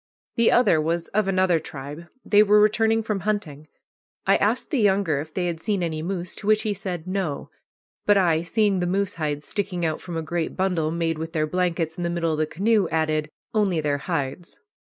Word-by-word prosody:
The 235 -1 +4
other 205 -10 +4
was 165 +2 -1
of 210 -1 0
another 185 -3 +2
tribe. 145 +3 -8 0.2
They 205 0 +5
were 210 0 +5
returning 220 +1 +3
from 215 -2 -2
hunting. 165 -8 -3 0.6
I - - +5
asked - - 0
the 285 - +1
younger 195 -8 +2
if 155 +2 -6
they 180 +2 -2
had 170 -2 -2
seen 195 +1 -1
any 160 -2 -2
moose, 180 0 -4
to 205 - -7
which 215 0 +4
he 215 - 0
said 180 -4 -5
"No"; 185 -6 -3 0.6
but 205 -1 +6
I, 170 -4 +3
seeing 200 +2 +1
the 175 - 0
moose 195 +2 0
hides 150 -1 -2
sticking 185 -4 -2
out 155 -1 -2
from 175 -2 -6
a 165 - -2
great 165 0 -3
bundle 180 -5 +1
made 165 -1 -1
with 160 +1 -5
their 155 -2 +1
blankets 170 -1 -1
in 175 - -3
the 170 - 0
middle 170 -1 0
of 155 - -2
the 155 - +1
canoe, 205 +2 +1
added, 155 -1 0 0.2
"Only 200 -6 +2
their 145 -2 0
hides." 155 +1 -4
175 Hz, 210 wpm, -24 LUFS, 160-200 Hz, 0.6 s, but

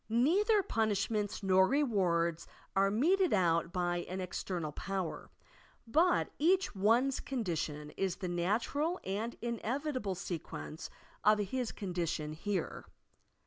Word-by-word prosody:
Neither 385 - +3
pun 225 -9 +1
ishments 205 0 -1
nor 190 0 +5
rewards 180 - +1 0.3
are 195 +1 +4
meted 345 - +3
out 170 -3 +2
by 175 -1 0
an 185 - -3
estemal 180 -3 -3
power, 195 -3 -4 0.6
but 325 +10 +3
each 370 +6 +3
one's 235 +7 +3
condition 160 - -3
is 190 -2 0
the 185 - -5
natural 225 - 0
and 215 +5 -3
in 235 -2 -2
evitable 255 - -2
sequence 165 -3 -6 0.3
of 215 0 +6
his 225 +4 -2
condition 170 -6 -3
here. 185 +2 -3
200 Hz, 120 wpm, -33 LUFS, 175-255 Hz, 0.6 s, of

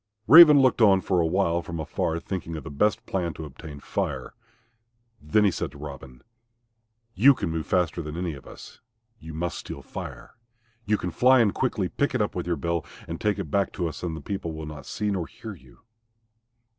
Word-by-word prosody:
Raven 150 +2 +10
looked 130 -2 +3
on 100 -3 +6
for 90 -2 +1
a 80 - +1
while 85 -1 +1
from 85 -1 -6
afar 80 +1 -2
thinking 85 -2 -5
of 75 - -6
the - - -8
best 105 +9 +1
plan 85 -4 -2
to 80 - -7
obtain 75 +1 -10
Fire. - - -3 0.9
Then 90 +8 +2
he 100 - +4
said - - -4
to - - -12
Robin, 70 -3 -10 0.9
"You 135 +6 +6
can 100 -9 -3
move 80 -1 -3
faster 90 -1 0
than 75 0 -6
any 90 -2 -2
of 70 - -12
us. - - -12 0.4
You 80 0 -9
must 85 +2 -3
steal - - -8
Fire. - - -8 0.5
You 105 +1 +2
can 90 -2 -4
fly 130 +7 +5
in 110 -4 +4
quickly, 110 -7 -1
pick 140 +9 -1
it - - +1
up 105 - -4
in 90 - -3
your 85 -1 0
bill 85 -1 -2 0.2
and 85 0 -6
take 105 -2 +1
it 90 -8 -5
back 100 -1 +1
to 90 - -2
us 80 - -7
and 85 -3 -3
the - - -8
people 95 -5 -4
will 80 0 -6
not 75 -3 -9
see 105 -1 -2
nor 90 -4 -2
hear 110 -2 -9
you." 65 -9 -18
85 Hz, 210 wpm, -26 LUFS, 80-100 Hz, 0.9 s, Raven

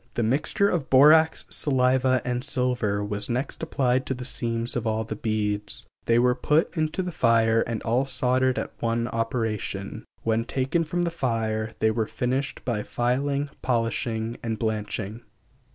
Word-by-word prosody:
The 120 - +1
mixture 145 - +2
of 170 -8 -1
borax, 155 +4 +6
saliva, 130 -2 +2
and 125 0 -1
silver 125 -7 0
was 105 +2 -3
next 125 +3 -2
applied 130 -5 0
to 130 - -1
the 125 0 -7
seams 115 -2 -2
of 120 -2 -1
all 110 0 0
the 110 0 -5
beads; 105 -1 -1 0.2
they 115 - +3
were 125 +1 +4
put 150 +8 +1
into 155 +3 -1
the 180 - -4
fire 115 -5 +3
and 115 -2 -3
all 125 +4 +1
soldered 130 0 +1
at - - -3
one 115 0 0
operation. 110 -3 -3 0.2
When 115 0 +1
taken 135 +7 0
from 175 +3 -1
the 170 - -1
fire 110 -7 -1
they 110 - +2
were 110 -1 -1
finished 130 +3 -2
by 115 -4 -1
filing, 140 +5 -1
polishing 115 -1 -1
and 115 -1 -2
blanching. 110 0 -3
120 Hz, 160 wpm, -25 LUFS, 110-130 Hz, 0.2 s, borax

